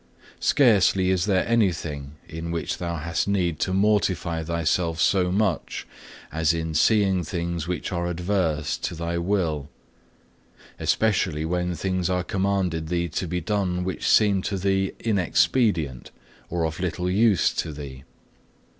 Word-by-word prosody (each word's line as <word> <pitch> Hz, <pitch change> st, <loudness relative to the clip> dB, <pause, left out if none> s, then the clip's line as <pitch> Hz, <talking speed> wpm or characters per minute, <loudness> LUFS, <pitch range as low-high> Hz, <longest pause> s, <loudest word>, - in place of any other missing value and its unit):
Scarcely 100 Hz, -8 st, +4 dB
is 90 Hz, -1 st, +1 dB
there 95 Hz, -3 st, +1 dB
anything 85 Hz, -11 st, 0 dB
in 80 Hz, +1 st, -6 dB
which 85 Hz, -1 st, -3 dB
thou 85 Hz, -1 st, -3 dB
hast 80 Hz, +3 st, -2 dB
need 90 Hz, -6 st, 0 dB
to 95 Hz, -, 0 dB
mortify 95 Hz, -4 st, +1 dB
thyself 85 Hz, 0 st, 0 dB
so 90 Hz, +1 st, +3 dB
much 100 Hz, -4 st, -1 dB, 0.5 s
as 80 Hz, 0 st, +1 dB
in 80 Hz, -1 st, -3 dB
seeing 95 Hz, +2 st, +3 dB
things 85 Hz, 0 st, -3 dB
which 90 Hz, +2 st, -3 dB
are 85 Hz, -1 st, -1 dB
adverse 90 Hz, -2 st, -1 dB
to 85 Hz, -, -4 dB
thy 85 Hz, +1 st, -2 dB
will; 85 Hz, -6 st, -1 dB, 1.1 s
especially 90 Hz, -8 st, +1 dB
when 90 Hz, +1 st, -1 dB
things 95 Hz, -1 st, -1 dB
are 90 Hz, -1 st, 0 dB
commanded 95 Hz, -4 st, -1 dB
thee 85 Hz, 0 st, -1 dB
to 90 Hz, -, -3 dB
be 90 Hz, +1 st, -2 dB
done 95 Hz, -2 st, -1 dB
which 95 Hz, 0 st, -2 dB
seem 100 Hz, -3 st, +4 dB
to 100 Hz, +1 st, -2 dB
thee 95 Hz, 0 st, +1 dB
inexpedient 95 Hz, -, +1 dB, 0.4 s
or 85 Hz, -1 st, -1 dB
of 80 Hz, +1 st, -4 dB
little 90 Hz, 0 st, -2 dB
use 100 Hz, 0 st, +3 dB
to 80 Hz, -, -3 dB
thee. 70 Hz, -3 st, -9 dB
90 Hz, 140 wpm, -24 LUFS, 80-95 Hz, 1.1 s, Scarcely